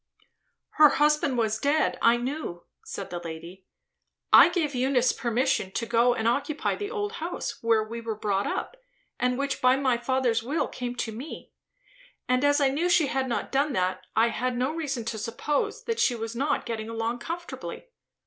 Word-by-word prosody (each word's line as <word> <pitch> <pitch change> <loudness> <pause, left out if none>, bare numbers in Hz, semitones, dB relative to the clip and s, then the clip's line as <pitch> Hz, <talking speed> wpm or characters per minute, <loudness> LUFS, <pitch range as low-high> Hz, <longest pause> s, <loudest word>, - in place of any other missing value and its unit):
"Her 300 -1 +9
husband 295 -3 +2
was 220 -1 0
dead, 285 -3 +1
I 230 +1 +5
knew," 245 - -4 0.2
said - - -7
the 175 - -3
lady. 170 +3 -9 0.7
"I - - +10
gave 310 -5 -1
Eunice 255 0 +2
permission 235 -4 0
to 230 - -2
go 235 +1 +3
and 225 - -1
occupy 285 +5 0
the 410 0 -5
old 415 -2 -3
house, 340 +2 -4
where 230 -1 +3
we 230 +2 -7
were 225 -1 -3
brought 200 -2 -1
up, - - -4 0.4
and 250 0 +1
which 280 0 -2
by 255 0 +5
my 260 -3 +1
father's 240 -2 +1
will 275 +8 -1
came 245 -1 -5
to 230 - -3
me; 250 +8 -8 0.8
and 255 +1 +2
as 285 0 +4
I 280 -2 +3
knew 315 +6 0
she 350 -3 +4
had 265 -1 -1
not 235 - -2
done 280 +1 +1
that, 185 -2 -1
I 225 +2 +4
had 245 +2 -2
no 255 +4 0
reason 280 -8 -3
to 225 -1 -3
suppose 235 +7 -2
that 460 -1 -2
she 245 - +3
was 225 0 -5
not 280 +5 0
getting 225 -2 -4
along 230 +1 -2
comfortably. 340 - -6
250 Hz, 185 wpm, -27 LUFS, 225-285 Hz, 0.8 s, I